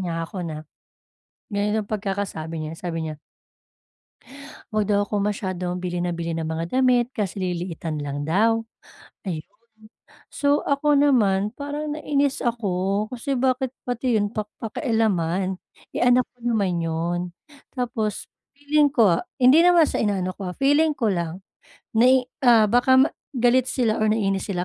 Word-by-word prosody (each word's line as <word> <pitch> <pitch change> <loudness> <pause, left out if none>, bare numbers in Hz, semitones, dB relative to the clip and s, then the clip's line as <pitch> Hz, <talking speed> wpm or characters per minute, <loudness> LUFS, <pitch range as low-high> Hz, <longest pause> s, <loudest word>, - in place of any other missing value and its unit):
niya 165 -2 -2
ako 185 +3 -7
na, 155 -3 -5 0.9
ganito 210 +1 0
pagkakasabi 195 -6 -4
niya, 155 - -5
sabi 165 -2 -3
niya 155 -1 -6 1.5
Huwag 215 -2 0
daw 205 0 +2
akong 205 0 -1
masyadong 185 -3 -3
bili 180 -1 -3
nang 175 0 -1
bili 170 -1 -3
ng 160 -1 -3
mga 165 +9 -2
damit 250 -1 +3
kasi 200 -3 -2
lilitan 175 -3 -3
lang 145 0 -4
daw 225 +6 +3 0.7
ayun, 155 -3 -4 0.9
so 285 0 +1
ako 290 +1 +2
naman 210 -8 +3
parang 295 +2 -4
nainis 285 -2 0
ako, 200 -3 -1
kasi 250 +3 -2
bakit 260 0 +1 0.2
pati 245 -1 0
yun 205 0 0
pak 215 -2 -4
pakialaman 195 - -1 0.4
eh, - - -2
anak 250 +1 +5
ko - - -39
naman 200 -7 +1
yun 165 +2 -1 0.6
tapos 225 -4 -2 0.3
feeling 290 +1 +3
ko 215 - +4 0.2
hindi 260 +5 +6
naman 350 -2 +6
sa - - -2
inaano 190 -4 0
ko 190 -2 -5
ah, - - -29
feeling 295 +3 +3
ko 230 -4 +1
lang 170 0 -3 0.6
nai 255 +3 +5 0.2
ah, 230 -3 +6
baka 260 +4 +5 0.3
galit 245 +1 +3
sila 230 -4 0
o - - +2
naiinis 195 -3 0
sila 180 -3 -2
210 Hz, 145 wpm, -23 LUFS, 180-250 Hz, 1.5 s, hindi